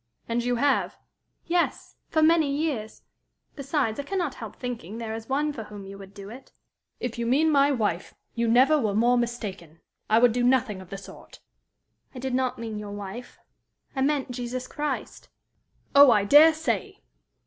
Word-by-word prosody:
"And 235 Hz, +1 st, -1 dB
you 245 Hz, 0 st, 0 dB
have?" 280 Hz, +3 st, +1 dB, 0.5 s
"Yes 345 Hz, 0 st, -1 dB
for 315 Hz, -1 st, +2 dB
many 320 Hz, -2 st, +4 dB
years. 280 Hz, -7 st, -3 dB, 0.5 s
Besides, 275 Hz, -5 st, -1 dB
I -, -, -2 dB
can 390 Hz, +7 st, -4 dB
not 340 Hz, -7 st, -1 dB
help 225 Hz, -5 st, -9 dB
thinking 230 Hz, -5 st, -6 dB
there 225 Hz, -1 st, -5 dB
is 225 Hz, +2 st, -7 dB
one 295 Hz, +2 st, 0 dB
for 225 Hz, -5 st, -7 dB
whom 205 Hz, -1 st, -10 dB
you 195 Hz, +1 st, -9 dB
would 195 Hz, 0 st, -13 dB
do 200 Hz, 0 st, -9 dB
it." 255 Hz, +3 st, -12 dB, 0.5 s
"If 240 Hz, -1 st, -4 dB
you 235 Hz, -, -1 dB
mean 300 Hz, +6 st, +3 dB
my 280 Hz, 0 st, +4 dB
wife, 205 Hz, -9 st, -2 dB, 0.2 s
you 235 Hz, 0 st, -1 dB
never 260 Hz, +7 st, +5 dB
were 215 Hz, -6 st, -1 dB
more 240 Hz, +3 st, +3 dB
mistaken. 210 Hz, -9 st, -4 dB, 0.3 s
I 215 Hz, -, +4 dB
would 245 Hz, 0 st, +5 dB
do 245 Hz, -, 0 dB
nothing 245 Hz, -5 st, +2 dB
of 185 Hz, -, -14 dB
the 195 Hz, -, -6 dB
sort." 195 Hz, -, -13 dB, 0.8 s
"I -, -, -7 dB
did 260 Hz, 0 st, -4 dB
not 255 Hz, 0 st, 0 dB
mean 225 Hz, -2 st, -5 dB
your 210 Hz, -1 st, -7 dB
wife. 205 Hz, +4 st, -8 dB, 0.6 s
I 265 Hz, -, -1 dB
mean 280 Hz, 0 st, +1 dB
Jesus 250 Hz, +1 st, -4 dB
Christ." 295 Hz, +2 st, -5 dB, 0.6 s
"Oh, 280 Hz, -1 st, +9 dB
I 210 Hz, -4 st, +4 dB
dare 305 Hz, +7 st, +7 dB
say! 235 Hz, -, -3 dB
245 Hz, 180 wpm, -26 LUFS, 215-280 Hz, 0.8 s, Oh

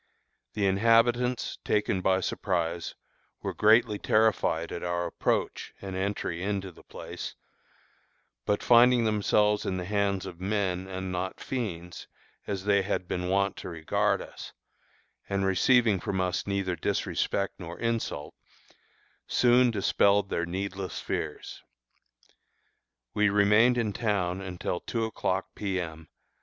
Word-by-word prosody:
The 105 Hz, -2 st, 0 dB
inhabitants, 115 Hz, +5 st, +2 dB
taken 105 Hz, -3 st, 0 dB
by 95 Hz, 0 st, +2 dB
surprise, 85 Hz, -3 st, -2 dB, 0.5 s
were -, -, -2 dB
greatly 110 Hz, 0 st, +4 dB
terrified 110 Hz, -7 st, +2 dB
at -, -, -5 dB
our 85 Hz, 0 st, -1 dB
approach 85 Hz, -, -2 dB
and 95 Hz, -1 st, -6 dB
entry 95 Hz, -3 st, -2 dB
into 100 Hz, -1 st, -2 dB
the -, -, -17 dB
place, -, -, -8 dB, 1.1 s
but 105 Hz, +10 st, 0 dB
finding 120 Hz, 0 st, +6 dB
themselves 105 Hz, -1 st, +2 dB
in 95 Hz, -, -2 dB
the 90 Hz, -, -4 dB
hands 100 Hz, -1 st, 0 dB
of 85 Hz, -, -8 dB
men, 95 Hz, -2 st, -1 dB
and 95 Hz, -1 st, -5 dB
not 90 Hz, +1 st, -3 dB
fiends, 90 Hz, -9 st, -5 dB, 0.4 s
as 100 Hz, -2 st, -3 dB
they 100 Hz, -1 st, +4 dB
had 95 Hz, -2 st, -2 dB
been 90 Hz, 0 st, -2 dB
wont 100 Hz, 0 st, +1 dB
to -, -, -7 dB
regard 80 Hz, -2 st, 0 dB
us, -, -, -10 dB, 0.8 s
and 100 Hz, 0 st, 0 dB
receiving 105 Hz, +2 st, +4 dB
from 95 Hz, +2 st, -2 dB
us 90 Hz, 0 st, -1 dB
neither 100 Hz, -2 st, -1 dB
disrespect 100 Hz, +4 st, -1 dB
nor 85 Hz, -1 st, -7 dB
insult, 115 Hz, -11 st, -2 dB, 0.9 s
soon 125 Hz, 0 st, +4 dB
dispelled 100 Hz, -2 st, +2 dB
their 85 Hz, 0 st, -1 dB
needless 95 Hz, +1 st, -4 dB
fears. -, -, -5 dB, 1.5 s
We 105 Hz, -1 st, +3 dB
remained 105 Hz, +5 st, +4 dB
in 110 Hz, -4 st, 0 dB
town 95 Hz, -5 st, -1 dB
until 90 Hz, -2 st, -3 dB
two 115 Hz, -2 st, -2 dB
o'clock 95 Hz, -3 st, -2 dB
P. 95 Hz, -2 st, -2 dB
M. 80 Hz, -2 st, -6 dB
100 Hz, 130 wpm, -28 LUFS, 90-105 Hz, 1.5 s, finding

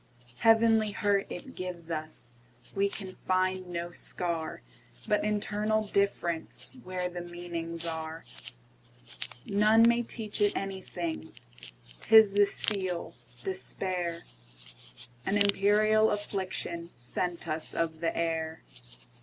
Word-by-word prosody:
Heavenly 225 Hz, -1 st, +5 dB
hurt 200 Hz, -1 st, +1 dB
it 260 Hz, +9 st, -7 dB
gives 175 Hz, -2 st, -6 dB
us; 155 Hz, -6 st, -5 dB, 0.4 s
We 200 Hz, 0 st, +2 dB
can 195 Hz, -2 st, -4 dB
find 185 Hz, 0 st, +1 dB
no 175 Hz, 0 st, -4 dB
scar, 170 Hz, -, -3 dB, 0.4 s
But -, -, +2 dB
internal 210 Hz, +1 st, 0 dB
differenceWhere 185 Hz, 0 st, -1 dB
the 175 Hz, -, -4 dB
meanings 170 Hz, -1 st, -5 dB
are. 160 Hz, 0 st, -4 dB, 1.2 s
None 215 Hz, +3 st, +5 dB
may 235 Hz, 0 st, +4 dB
teach 225 Hz, -3 st, -4 dB
it 205 Hz, 0 st, +3 dB
anything,'T 160 Hz, -, -7 dB
is 220 Hz, -3 st, +9 dB
the 205 Hz, 0 st, +5 dB
seal, 185 Hz, -6 st, 0 dB, 0.3 s
despair,—An 125 Hz, -, -5 dB
imperial 210 Hz, +2 st, +5 dB
afflictionSent 175 Hz, -, -3 dB
us 155 Hz, 0 st, -2 dB
of 160 Hz, -1 st, -1 dB
the 165 Hz, 0 st, -1 dB
air. 160 Hz, -1 st, -2 dB
180 Hz, 95 wpm, -30 LUFS, 165-205 Hz, 1.2 s, is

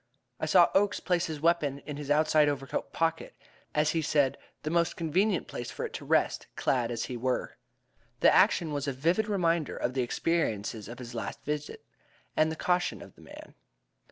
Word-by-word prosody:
I -, -, -2 dB
saw -, -, +6 dB
Oakes 205 Hz, +1 st, +2 dB
place 180 Hz, -1 st, 0 dB
his 155 Hz, -3 st, -5 dB
weapon 160 Hz, -4 st, +2 dB
in 145 Hz, -1 st, -6 dB
his 145 Hz, -1 st, -7 dB
outside 150 Hz, 0 st, +4 dB
overcoat 135 Hz, -2 st, -3 dB
pocket 165 Hz, 0 st, -1 dB, 0.4 s
as 150 Hz, 0 st, +3 dB
he 165 Hz, -, 0 dB
said, 145 Hz, -3 st, +2 dB, 0.3 s
the 155 Hz, -, -2 dB
most 170 Hz, 0 st, +1 dB
convenient 180 Hz, +4 st, +1 dB
place 120 Hz, -, -6 dB
for -, -, -4 dB
it -, -, -7 dB
to -, -, -6 dB
rest, -, -, +1 dB
clad 125 Hz, -3 st, +1 dB
as 115 Hz, -1 st, -3 dB
we 125 Hz, -, -5 dB
were. 125 Hz, +2 st, -2 dB, 0.7 s
The -, -, +6 dB
action 160 Hz, -3 st, +4 dB
was 145 Hz, 0 st, -2 dB
a 140 Hz, -, 0 dB
vivid 170 Hz, -, +1 dB
reminder 170 Hz, -6 st, 0 dB
of 125 Hz, -, -1 dB
the 130 Hz, -, 0 dB
experiences 115 Hz, -6 st, -1 dB
of 120 Hz, -, -8 dB
his 120 Hz, -1 st, -8 dB
last 115 Hz, -, -5 dB
visit, 150 Hz, 0 st, -4 dB, 0.5 s
and 155 Hz, -, +4 dB
of 160 Hz, -, -5 dB
the -, -, -8 dB
caution 180 Hz, 0 st, +1 dB
of -, -, -14 dB
the -, -, -19 dB
man. -, -, -12 dB
150 Hz, 195 wpm, -29 LUFS, 135-170 Hz, 0.7 s, saw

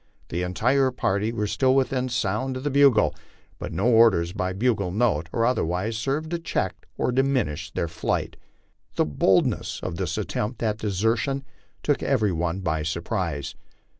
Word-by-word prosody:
The 85 Hz, -, -2 dB
entire 125 Hz, +9 st, +2 dB
party 105 Hz, -3 st, 0 dB
were 105 Hz, -2 st, -2 dB
still 130 Hz, +5 st, +2 dB
within 130 Hz, -1 st, +1 dB
sound 120 Hz, +3 st, -1 dB
of 130 Hz, -, -7 dB
the 145 Hz, -, -1 dB
bugle, 140 Hz, -5 st, +5 dB, 0.5 s
but -, -, -5 dB
no -, -, -1 dB
orders 110 Hz, -8 st, +5 dB
by 95 Hz, -2 st, -2 dB
bugle 100 Hz, -1 st, 0 dB
note 95 Hz, -6 st, +1 dB
or 115 Hz, -, +1 dB
otherwise 110 Hz, -2 st, 0 dB
served 140 Hz, +7 st, -2 dB
to 170 Hz, -, -1 dB
check 95 Hz, -, -3 dB
or -, -, +1 dB
diminish 125 Hz, -, 0 dB
their 85 Hz, -, -2 dB
flight. 80 Hz, -, -2 dB, 0.6 s
The -, -, +2 dB
boldness 75 Hz, -2 st, +1 dB
of 85 Hz, -, -4 dB
this 85 Hz, -3 st, -2 dB
attempt 110 Hz, +3 st, -3 dB
at 110 Hz, -1 st, 0 dB
desertion 115 Hz, +7 st, 0 dB, 0.4 s
took 145 Hz, -, +1 dB
every 110 Hz, -7 st, +2 dB
one 85 Hz, +2 st, -2 dB
by 80 Hz, -3 st, -1 dB
surprise. 85 Hz, -1 st, -3 dB
110 Hz, 160 wpm, -25 LUFS, 90-130 Hz, 0.6 s, bugle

